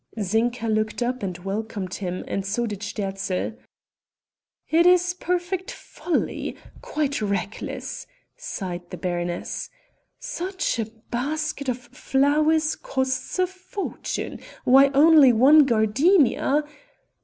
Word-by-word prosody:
Zinka 225 Hz, +4 st, 0 dB
looked 215 Hz, +2 st, 0 dB
up 250 Hz, +1 st, -2 dB
and 185 Hz, -3 st, -3 dB
welcomed 195 Hz, 0 st, -4 dB
him 185 Hz, -2 st, -4 dB
and 195 Hz, -, -2 dB
so 220 Hz, +5 st, -1 dB
did 210 Hz, -4 st, -5 dB
Sterzl. 195 Hz, -1 st, -3 dB, 1.1 s
"It 335 Hz, +2 st, +4 dB
is 360 Hz, 0 st, +4 dB
perfect 360 Hz, +1 st, -2 dB
folly... 350 Hz, -, -3 dB, 0.3 s
quite 305 Hz, -, -2 dB
reckless...." 200 Hz, -, -4 dB, 0.3 s
sighed 180 Hz, -, -6 dB
the 180 Hz, -, -7 dB
baroness, 175 Hz, 0 st, -3 dB, 0.5 s
"such 385 Hz, -, -3 dB
a 225 Hz, -, 0 dB, 0.3 s
basket 285 Hz, +2 st, -2 dB
of 250 Hz, -, -1 dB
flowers 290 Hz, +5 st, +1 dB
costs 260 Hz, +3 st, -2 dB
a 370 Hz, -, +3 dB
fortune. 375 Hz, +2 st, -5 dB, 0.2 s
Why, 270 Hz, +2 st, +7 dB
only 300 Hz, -2 st, +7 dB
one 275 Hz, +5 st, +7 dB
gardenia...." 275 Hz, -, +3 dB
255 Hz, 110 wpm, -24 LUFS, 205-315 Hz, 1.1 s, Why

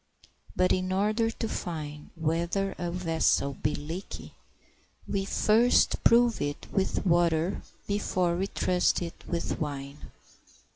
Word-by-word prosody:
But 185 Hz, 0 st, +3 dB
in 185 Hz, 0 st, -1 dB
order 215 Hz, +4 st, +1 dB
to 225 Hz, 0 st, -4 dB
find 150 Hz, -7 st, -5 dB
whether 170 Hz, +4 st, -1 dB
a 175 Hz, -, -2 dB
vessel 165 Hz, -5 st, +1 dB
be 150 Hz, +3 st, -1 dB
leaky 165 Hz, +6 st, -7 dB, 0.7 s
we 195 Hz, -1 st, -1 dB
first 225 Hz, +5 st, +3 dB
prove 235 Hz, -1 st, +4 dB
it 145 Hz, 0 st, -3 dB
with 195 Hz, +1 st, 0 dB
water 170 Hz, 0 st, +2 dB, 0.2 s
before 185 Hz, -4 st, 0 dB
we 190 Hz, +3 st, -1 dB
trust 180 Hz, -2 st, +1 dB
it 170 Hz, -, -8 dB
with 170 Hz, -1 st, -2 dB
wine. 140 Hz, -1 st, -5 dB
175 Hz, 125 wpm, -28 LUFS, 160-195 Hz, 0.7 s, prove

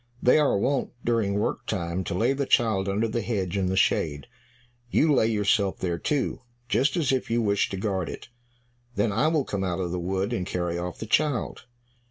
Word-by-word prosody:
They 125 Hz, +5 st, +5 dB
are 145 Hz, -8 st, +3 dB
wont, 135 Hz, +7 st, 0 dB
during 115 Hz, -4 st, +1 dB
work 105 Hz, -, -2 dB
time, 85 Hz, +2 st, -2 dB
to -, -, -3 dB
lay 120 Hz, +7 st, +2 dB
the 140 Hz, 0 st, -2 dB
child 105 Hz, -5 st, +2 dB
under 105 Hz, +4 st, +1 dB
the 115 Hz, +1 st, -2 dB
hedge 100 Hz, -5 st, -2 dB
in 95 Hz, -2 st, 0 dB
the 95 Hz, +1 st, -1 dB
shade; 75 Hz, -6 st, +1 dB, 0.6 s
you 150 Hz, +5 st, +3 dB
lay 115 Hz, -4 st, +3 dB
yourself 105 Hz, -2 st, +1 dB
there 85 Hz, -2 st, -2 dB
too, 145 Hz, -3 st, -1 dB, 0.3 s
just 125 Hz, -, +1 dB
as 150 Hz, -6 st, +1 dB
if 130 Hz, -1 st, -1 dB
you 115 Hz, +1 st, +1 dB
wished 100 Hz, -3 st, +1 dB
to 95 Hz, -, -4 dB
guard 95 Hz, -3 st, -2 dB
it. -, -, -8 dB, 0.7 s
Then 105 Hz, 0 st, +1 dB
I 135 Hz, +10 st, +2 dB
will 155 Hz, -4 st, +1 dB
come 100 Hz, -1 st, -3 dB
out 90 Hz, -1 st, -2 dB
of 90 Hz, -2 st, -2 dB
the 90 Hz, -, -2 dB
wood, 95 Hz, +5 st, -1 dB
and 105 Hz, -, -1 dB
carry 90 Hz, -2 st, -2 dB
off 90 Hz, 0 st, -4 dB
the -, -, -6 dB
child. 140 Hz, 0 st, 0 dB
105 Hz, 210 wpm, -26 LUFS, 95-120 Hz, 0.7 s, They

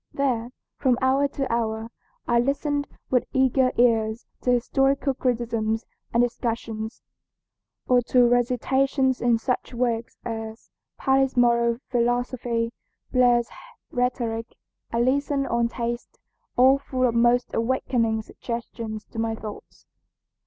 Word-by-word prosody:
There, 245 Hz, -4 st, 0 dB, 0.3 s
from 255 Hz, -2 st, +2 dB
hour 265 Hz, +2 st, +3 dB
to 275 Hz, -3 st, -3 dB
hour, 225 Hz, 0 st, -2 dB, 0.4 s
I 235 Hz, 0 st, +3 dB
listened 285 Hz, +3 st, 0 dB, 0.2 s
with 250 Hz, -2 st, +2 dB
eager 260 Hz, -1 st, +3 dB
ears 225 Hz, -2 st, +2 dB, 0.2 s
to -, -, -1 dB
historical 270 Hz, +3 st, +2 dB
criticisms 230 Hz, -3 st, -1 dB, 0.3 s
and 235 Hz, +1 st, +3 dB
discussions, 230 Hz, -2 st, -3 dB, 0.8 s
or 250 Hz, -1 st, +5 dB
to 250 Hz, -1 st, +5 dB
recitations 260 Hz, +2 st, +1 dB
in 240 Hz, -1 st, +3 dB
such 250 Hz, +1 st, -2 dB
works 235 Hz, -1 st, -1 dB
as 225 Hz, -1 st, -6 dB, 0.3 s
Paley's 270 Hz, -1 st, +2 dB
Moral 235 Hz, -1 st, +3 dB
Philosophy, 240 Hz, -1 st, 0 dB, 0.4 s
Blair's 245 Hz, -2 st, +4 dB, 0.4 s
Rhetoric, 235 Hz, -2 st, -2 dB, 0.4 s
Allison 275 Hz, +4 st, +1 dB
on 235 Hz, -2 st, +1 dB
Taste, 235 Hz, 0 st, -4 dB, 0.4 s
all 265 Hz, +2 st, +6 dB
full 255 Hz, -2 st, -1 dB
of 235 Hz, -, 0 dB
most 240 Hz, +1 st, +3 dB
awakening 230 Hz, -2 st, 0 dB
suggestions 230 Hz, -2 st, -6 dB
to 225 Hz, -, -8 dB
my 225 Hz, 0 st, 0 dB
thoughts. 215 Hz, -1 st, -10 dB
240 Hz, 115 wpm, -25 LUFS, 230-260 Hz, 0.8 s, all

